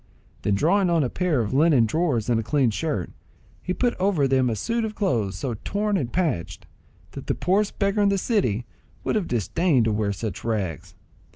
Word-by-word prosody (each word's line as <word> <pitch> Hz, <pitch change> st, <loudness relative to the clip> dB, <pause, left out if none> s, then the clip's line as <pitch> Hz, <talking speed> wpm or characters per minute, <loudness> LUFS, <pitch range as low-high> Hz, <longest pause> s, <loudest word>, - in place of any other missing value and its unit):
Then 100 Hz, -, +1 dB
drawing 180 Hz, -, +2 dB
on 165 Hz, -3 st, +3 dB
a 125 Hz, -, -2 dB
pair 170 Hz, -8 st, +1 dB
of 105 Hz, 0 st, -3 dB
linen 145 Hz, -4 st, +4 dB
drawers 130 Hz, -3 st, 0 dB
and 120 Hz, -2 st, +2 dB
a -, -, -2 dB
clean 130 Hz, 0 st, +2 dB
shirt, 125 Hz, -, -2 dB, 0.5 s
he 185 Hz, -, -4 dB
put 240 Hz, +6 st, +1 dB
over 185 Hz, -7 st, +2 dB
them 130 Hz, -1 st, +2 dB
a 115 Hz, -, -1 dB
suit 230 Hz, -, -1 dB
of 215 Hz, -1 st, -4 dB
clothes 115 Hz, -, 0 dB
so 120 Hz, +4 st, -3 dB
torn 205 Hz, +1 st, -1 dB
and 130 Hz, -10 st, -1 dB
patched, 155 Hz, -, -2 dB, 0.5 s
that -, -, -9 dB
the -, -, 0 dB
poorest 200 Hz, +3 st, 0 dB
beggar 200 Hz, +1 st, +1 dB
in 200 Hz, -, +4 dB
the 200 Hz, -, +1 dB
city 155 Hz, -, 0 dB, 0.4 s
would -, -, -1 dB
have 210 Hz, -5 st, 0 dB
disdained 125 Hz, -, +1 dB
to 110 Hz, -, +1 dB
wear 105 Hz, -1 st, 0 dB
such 100 Hz, +1 st, -5 dB
rags. 100 Hz, -, -3 dB
145 Hz, 200 wpm, -24 LUFS, -, 0.5 s, linen